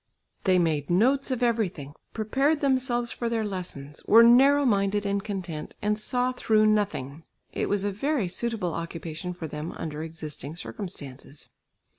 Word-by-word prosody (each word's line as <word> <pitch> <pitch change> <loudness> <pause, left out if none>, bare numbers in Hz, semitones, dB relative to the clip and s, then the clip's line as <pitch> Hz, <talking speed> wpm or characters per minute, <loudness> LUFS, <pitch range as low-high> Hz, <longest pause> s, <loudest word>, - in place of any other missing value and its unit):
They 185 -2 +4
made 160 -5 0
notes 255 +11 +3
of 250 -2 -1
everything, 190 - -1 0.2
prepared 270 +8 +1
themselves 255 -3 +1
for 235 - -3
their 225 -2 -1
lessons, 175 -8 -6
were 230 +2 +8
narrow 275 +5 +6
minded 205 -2 +1
and 200 0 -1
content, 180 -7 -5
and 210 0 +1
saw 250 +4 0
through 220 -3 +2
nothing. 200 -9 0 0.3
It - - -2
was 205 -1 0
a 205 - 0
very 250 +1 -1
suitable 195 -2 -2
occupation 165 +1 -5
for 175 -2 -7
them 150 +1 -5
under 155 -1 -5
existing 155 -2 -6
circumstances. 145 -7 -8
200 Hz, 150 wpm, -26 LUFS, 165-235 Hz, 0.3 s, were